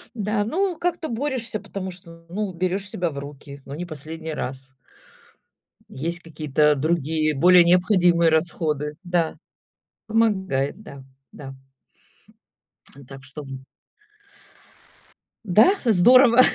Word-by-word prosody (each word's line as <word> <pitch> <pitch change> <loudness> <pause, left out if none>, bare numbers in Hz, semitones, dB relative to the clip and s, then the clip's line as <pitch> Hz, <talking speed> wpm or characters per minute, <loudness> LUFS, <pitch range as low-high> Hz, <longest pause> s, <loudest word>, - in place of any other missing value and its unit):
Да, 210 0 -1
ну 360 - -1
как-то 345 -2 -2
борешься, 235 -3 -3
потому 190 -1 -6
что, 170 -2 -14
ну, 200 +2 -3
берешь 185 +3 -2
себя 175 -4 -2
в 140 - -9
руки: 140 0 -10
ну 140 - -9
не 175 +3 -5
последний 160 0 -7
раз. 130 -1 -6 1.2
Есть 170 +5 -4
какие-то 150 -2 +1
другие, 155 0 0
более 180 +4 +6
необходимые 175 -1 +3
расходы. 155 -2 -1
Да, 175 -2 -1 0.7
помогает, 195 -8 0
да, 140 -10 -12 0.3
да. 135 -2 -10 1.5
Так 135 -1 -11
что, 135 +2 -9
в - - -12 2.0
Да, 210 - +5 0.2
здорово. 240 +4 +6
170 Hz, 110 wpm, -23 LUFS, 150-205 Hz, 2.0 s, более